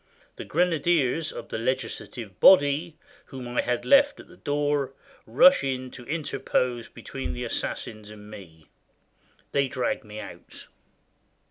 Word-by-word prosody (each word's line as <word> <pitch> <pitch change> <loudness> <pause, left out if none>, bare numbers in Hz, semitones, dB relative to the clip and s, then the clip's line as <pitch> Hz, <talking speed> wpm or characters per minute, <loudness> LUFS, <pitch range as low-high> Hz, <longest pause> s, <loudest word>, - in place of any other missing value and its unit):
The - - -8
grenadiers 165 -3 +1
of - - -8
the - - -3
legislative 115 -4 -4
body, 155 -1 +5 0.3
whom 130 -3 -8
I 120 - 0
had 125 0 -2
left 280 +1 +5
at - - -12
the - - -16
door, 145 -2 -1 0.3
rush 275 +2 +6
in 130 -1 -3
to 120 - -11
interpose 130 -6 -1
between 135 - -6
the 125 - -5
assassins 110 -2 -4
and 105 -1 -12
me. 85 -7 -12 0.9
They 140 -1 +2
drag 130 -1 -2
me 105 0 -9
out. - - -10
130 Hz, 135 wpm, -26 LUFS, 120-150 Hz, 0.9 s, rush